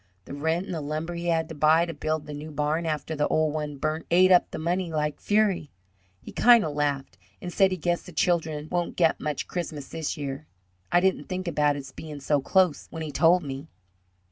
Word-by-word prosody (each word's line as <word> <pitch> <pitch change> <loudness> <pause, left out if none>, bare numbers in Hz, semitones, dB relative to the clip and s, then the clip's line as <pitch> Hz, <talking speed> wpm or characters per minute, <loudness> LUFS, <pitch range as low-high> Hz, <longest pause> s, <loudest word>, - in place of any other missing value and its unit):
The - - -8
rent 160 +5 -1
and 185 - -5
the 160 - -3
lumber 155 +4 -3
he 170 0 -4
had 165 -1 +1
to - - -6
buy 155 +2 +4
to 165 - -6
build 155 0 -2
the 150 - -7
new 150 +2 -7
barn 150 +3 -1
after 155 0 -2
the 150 0 +1
old 155 -1 +1
one 150 -2 -4
burnt 155 +3 -2
ate 185 +2 +5
up 180 - +5
the - - -6
money 175 +2 -1
like 150 -1 -1
fury. 200 -7 +1 0.5
He - - -9
kind 235 -4 +6
of 150 - -3
laughed, 140 -8 -2 0.2
and 175 - -6
said 195 -1 +4
he 185 - -2
guessed 175 +1 -1
the - - -9
children 160 -4 0
wouldn't 175 -1 -1
get 165 -3 +2
much 150 -2 -3
Christmas 155 -5 -5
this 160 -2 -4
year. 140 0 -5 0.4
I 175 - +4
didn't 190 0 +1
think 185 0 -4
about 150 -3 +2
it's 135 -2 -7
being 150 0 -8
so 140 +1 +1
close 180 0 +2
when 160 - -6
he 155 - -5
told 170 +4 +4
me." 140 +1 -6
155 Hz, 220 wpm, -26 LUFS, 150-175 Hz, 0.5 s, kind